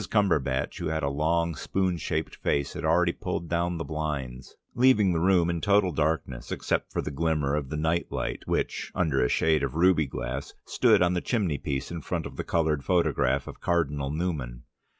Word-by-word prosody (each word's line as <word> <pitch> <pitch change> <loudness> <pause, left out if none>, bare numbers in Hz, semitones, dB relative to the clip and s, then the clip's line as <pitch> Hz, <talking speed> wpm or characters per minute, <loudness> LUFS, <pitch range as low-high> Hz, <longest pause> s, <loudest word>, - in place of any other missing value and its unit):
Cumberbatch 85 -11 +1
who - - -2
had 80 -1 -1
a 70 - 0
long 85 +3 +1
spoon 95 +2 -1
shaped 80 0 -3
face, 70 -1 -1
had - - -6
already 85 +2 +3
pulled 85 - -4
down 85 +1 0
the 80 - -3
blinds, 70 -6 -4 0.2
leaving 120 -7 +4
the 80 - +1
room 90 -1 +3
in 85 -1 -1
total 100 -2 +3
darkness 75 -5 -2
except - - -1
for - - -2
the - - -4
glimmer 75 -1 0
of 75 -3 -2
the 75 - -3
night 80 +3 0
light - - -3
which, - - -2
under 80 -8 +1
a 60 - +1
shade 80 -2 +2
of 70 +1 -2
ruby 85 -3 +4
glass, 65 +1 -5
stood - - +4
on 90 0 +2
the 90 - 0
chimneypiece 75 - -2
in 85 -1 -5
front - - -3
of - - -8
the - - -3
coloured 80 -4 0
photograph 90 -2 +1
of - - -10
Cardinal 75 -5 0
Newman. 75 -7 -3
80 Hz, 190 wpm, -27 LUFS, 70-85 Hz, 0.2 s, leaving